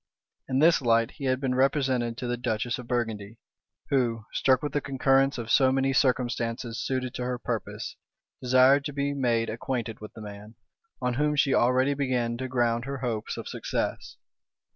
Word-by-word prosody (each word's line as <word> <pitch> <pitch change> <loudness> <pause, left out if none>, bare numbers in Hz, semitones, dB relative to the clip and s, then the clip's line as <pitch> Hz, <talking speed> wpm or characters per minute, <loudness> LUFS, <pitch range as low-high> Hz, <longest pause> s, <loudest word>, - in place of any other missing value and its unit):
In 130 - 0
this 160 +3 +5
light 115 -2 +2
he 140 - -7
had 130 0 +1
been 135 -2 -1
represented 130 -3 +1
to 130 - -5
the 120 - 0
duchess 120 0 -2
of 125 - -9
Burgundy, 115 -3 -3 0.5
who, 120 -5 +1
struck 130 0 +2
with 145 - -3
the 145 - 0
concurrence 135 0 +2
of 115 -1 -4
so 130 0 +5
many 135 0 +1
circumstances 120 -3 0
suited 130 -1 -2
to 125 - -4
her 125 0 -2
purpose, - - -5 0.4
desired 130 +2 +5
to 145 - -4
be 140 0 -1
made 120 -4 +1
acquainted 115 0 -4
with 105 -1 -9
the 110 - -10
man, 105 +1 -10 0.5
on 125 0 +1
whom 150 +3 +1
she 140 -2 +3
already 130 +3 +3
began 125 -4 -1
to 130 +1 -4
ground 120 -2 0
her 140 0 -4
hopes 120 -4 -3
of - - -6
success. - - -3
125 Hz, 180 wpm, -27 LUFS, 115-135 Hz, 0.5 s, this